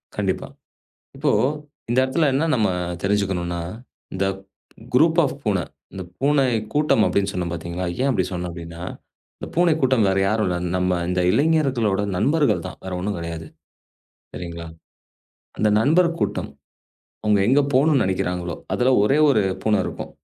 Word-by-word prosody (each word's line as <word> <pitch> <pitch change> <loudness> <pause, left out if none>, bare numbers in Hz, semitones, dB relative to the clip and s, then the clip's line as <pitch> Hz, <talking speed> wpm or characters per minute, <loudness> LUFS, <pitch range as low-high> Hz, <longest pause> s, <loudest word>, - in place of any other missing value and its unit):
கண்டிப்பா - - -2 0.7
இப்போ - - +1 0.6
இந்த 120 - +1
இடத்துல 150 +4 +1
என்ன 140 +4 +2
நம்ம 110 -4 +2 0.3
தெரிஞ்சுக்கணும்னா 95 -4 -1 0.5
இந்த 95 +1 0 0.7
க்ரூப் 160 +6 +4
ஆஃப் 140 - -1
பூனை. 100 -6 0 0.3
இந்த 95 - -6 0.2
பூனை 140 0 +3 0.3
கூட்டம் 150 -7 +3
அப்படின்னு 100 0 +1
சொன்னேன் 90 -2 -3
பாத்தீங்களா. 85 +2 -4 0.2
ஏன் 135 - +2
அப்படி 100 -8 +1
சொன்னேன் 90 -1 -4
அப்படின்னா, 85 0 -9 0.5
அந்தப் - - -9
பூனை 175 0 +4
கூட்டம் 130 -4 +3
வேற 95 0 +1
யாரும் 105 +1 +1
இல்ல. 90 - -1 0.2
நம்ம 90 -1 +1
இந்த 90 0 0
இளைஞர்களோட 135 - +2
நண்பர்கள் 140 - +2
தான். 90 - -8
வேற 95 - -5
ஒண்ணும் 100 +2 -2
கெடையாது. 85 -1 -6 0.9
சரிங்களா? 85 -1 -7 0.9
அந்த 110 - +3
நண்பர் 165 +8 +4
கூட்டம். - - -2 0.7
அவங்க 105 -1 +3
எங்க 135 +4 +5
போகணும்னு 140 0 +4
நெனைக்கிறாங்களோ 90 -2 -2 0.2
அதுல 125 +1 +2
ஒரே 135 +8 +3
ஒரு 115 -7 +4 0.2
பூனை 105 -1 +2
இருக்கும். - - -6
105 Hz, 140 wpm, -22 LUFS, 90-135 Hz, 0.9 s, எங்க